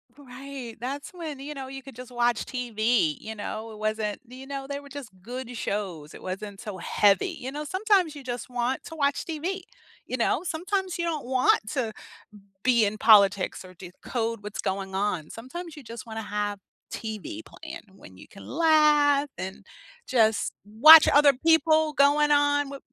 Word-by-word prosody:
Right, 265 -3 -9
that's 275 +4 -5
when, 320 -6 -7
you 295 +2 -7
know, 270 -1 -6
you 270 0 -8
could 265 -3 -13
just 250 0 -10
watch 240 -2 +1
TV, 225 - 0
you 220 - -7
know, 220 +1 -6
it 215 - -11
wasn't, 215 -1 -2
you 255 +2 -11
know, 275 -1 -6
they 280 0 -3
were 285 - -13
just 275 -4 -8
good 245 +1 -7
shows, 180 -9 -4
it - - -11
wasn't 195 +2 -6
so 205 -3 -6
heavy, 205 - +2
you 260 +2 -5
know, 300 +1 -5
sometimes 375 -2 +1
you 285 - -9
just 245 -2 -5
want 245 +1 -2
to 325 - -8
watch 280 -2 0
TV, 345 +4 -3 0.4
you - - -4
know, 260 +6 +1
sometimes 370 +2 -2
you 340 - 0
don't 310 -6 -3
want 255 0 +3
to 240 -6 -2 0.7
be 240 -2 +4
in 210 +1 -2
politics 200 -4 +4
or 185 0 -13
decode 220 +5 -5
what's 210 0 -7
going 190 0 -3
on, 190 -6 -1
sometimes 315 +8 -8
you 295 - -10
just 230 -1 -9
wanna 225 -1 -6
have 205 -1 -3 0.3
TV 220 - -6
playing 325 +1 -10
when 95 - -15
you 100 - -14
can 195 - -14
laugh 295 -2 +4
and 190 +1 -7 0.4
just 225 -4 +2
watch 295 +10 +9
other 290 0 +6
people 315 -1 +4
going 295 +1 +4
on 290 0 +3
wi 275 0 -8
255 Hz, 180 wpm, -26 LUFS, 215-295 Hz, 0.7 s, watch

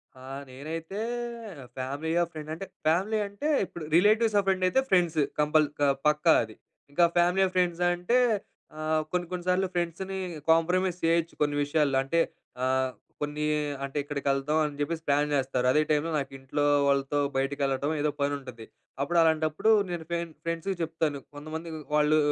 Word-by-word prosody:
ఆ! 130 - -13 0.2
నేనైతే 160 +8 -6 0.8
ఫ్యామిలియా? 150 +6 -1
ఫ్రెండా? 155 0 -7
అంటే 195 - -6 0.2
ఫ్యామిలీ 195 +7 +2
అంటే 205 +9 -5 0.2
ఇప్పుడు 170 -3 -9
రిలేటివ్స్ 215 +4 +4
ఆర్ 200 - +2
ఫ్రెండ్ 190 -1 +2
అయితే 265 +9 +3
ఫ్రెండ్స్ 175 -4 +3 0.2
కంపల్ 150 +1 +4 0.2
ఆహ్, 135 - +3
పక్కా 150 +2 +4
అది. 110 -1 -10 0.4
ఇంకా 170 +4 +4
ఫ్యామిలీయా, 180 +2 +4
ఫ్రెండ్సా 175 -1 +2
అంటే 180 +8 +1 0.6
ఆహ్, 155 0 +1
కొన్ని 180 -1 0
కొన్ని 180 -1 -4
సార్లు 185 +1 +2
ఫ్రెండ్స్‌ని 175 +3 -2 0.3
కాంప్రమైస్ 180 +2 +2
చేయొచ్చు. 165 0 +2
కొన్ని 145 -1 +2
విషయాల్లో 145 -2 +1
అంటే 165 +5 0 0.4
ఆహ్, 130 0 +1 0.3
కొన్ని 150 +1 -2 0.4
అంటే 140 +1 -4
ఇక్కడికెళ్దాం. 140 +1 0
అని 145 -1 -5
చెప్పేసి 160 +2 -2
ప్లాన్ 145 +1 +2
చేస్తారు 130 -2 0
అదే 150 - +4
టైమ్‌లో 155 +2 +1
నాకు 135 -1 -5
ఇంట్లో 145 +2 -1 0.2
వాళ్ళతో 140 +1 +1 0.2
బయటికి 135 +2 -1
వెళ్ళటం 140 +3 0
ఏదో 150 - +2
పని 140 0 +1
ఉంటది. 120 -4 -10 0.4
అప్పుడు 170 +5 0
అలాంటప్పుడు 160 +4 +2 0.2
నేను 170 -2 -4
ఫ్రెం 170 0 -1 0.2
ఫ్రెండ్స్‌కి 165 +3 -2
చెప్తాను. 160 -3 -1 0.2
కొంతమంది 155 +3 -6 0.3
వాళ్ళు 150 +1 +4
155 Hz, 155 wpm, -28 LUFS, 145-175 Hz, 0.8 s, రిలేటివ్స్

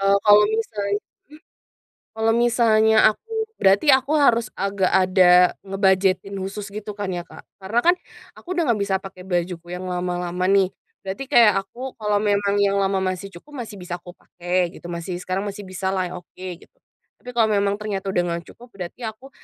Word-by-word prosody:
Eee, 195 0 +3
kalo 205 0 +8 0.2
misalnya 205 -2 -2 0.3
mmm? 300 +2 -16 0.7
Kalau 225 0 +1
misalnya 220 -2 +3
aku 450 - -12 0.3
berarti 195 +8 +4
aku 270 +3 0
harus 230 -2 +3
agak 195 -1 0
ada 180 -1 +5
ngebudgetin 195 0 +1
khusus 200 +1 -5
gitu 210 0 -6
kan 200 -2 -3
ya 175 - -3
Kak? - - -13 0.2
Karena 215 +5 -1
kan, 350 - +7 0.4
aku - - -17
udah - - +3
gak 205 - -5
bisa 195 - -1
pake 190 -1 -10
bajuku 175 -2 -2
yang 180 +1 -5
lama-lama 180 0 -2
nih. 195 -2 +4 0.3
Berarti 195 +8 -5
kayak 230 -6 +6
aku 250 +6 -8
kalau 210 -1 +1
memang 205 -1 +1
yang 200 0 +2
lama 195 0 +1
masih 185 +1 -3
cukup 290 +12 -14
masih 210 - -11
bisa 175 -1 -5
aku 175 0 -12
pake 175 0 -2
gitu - - -11
masih 170 +1 -4
sekarang 185 +2 -3
masih 205 +1 -9
bisa 190 0 -3
lah 185 -1 0
oke - - -34 0.3
gitu. - - -21 0.4
Tapi 250 - -9
kalau 225 -2 +3
memang 200 -1 +2
ternyata 200 -2 -3
udah 180 -2 +1
nggak 170 0 -3
cukup, 240 - -15
berarti 185 +6 -8
aku 220 +5 -9
195 Hz, 180 wpm, -22 LUFS, 185-215 Hz, 0.7 s, kalo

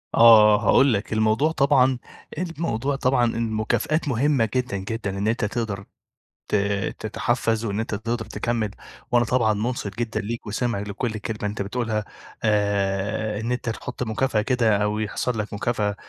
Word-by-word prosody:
آه 110 -2 +8
هاقول 135 -2 +5
لك، 105 +1 -2
الموضوع 110 +8 +2
طبعًا 135 -4 +3 0.4
الموضوع 150 -6 -2
طبعًا، 130 -2 +2
المكافآت 115 +8 0
مهمة 130 -3 +2
جدًا، 125 -5 0
جدًا 100 0 -4
إن 100 +2 -1
أنت، 115 0 +1
تقدر 105 -3 -3 0.6
ت - - 0 0.4
تتحفز 115 +1 -1
وإن 100 -1 -2
أنت 110 -1 -2
تقدر 115 +2 -3
تكمل، 115 -3 -2 0.4
وأنا 120 -1 +4
طبعًا 115 -3 +2
مُنصِت 105 -1 -3
جدًا 115 -1 -1
ليك 115 +2 -5
وسامع 110 +1 -1
لكل 105 +3 -3
كلمة 110 0 -5
أنت 105 - -4
بتقولها، 110 0 -2 0.4
آآ 105 0 0
إن 115 +3 -3
أنت 125 -1 -2
تحط 125 +2 -5
مكافأة 110 0 0
كده 115 -2 +2
أو 105 +1 0
يحصل 110 +2 -2
لك 105 0 -4
مكافأة، 105 -1 -1
110 Hz, 150 wpm, -24 LUFS, 105-125 Hz, 0.6 s, آه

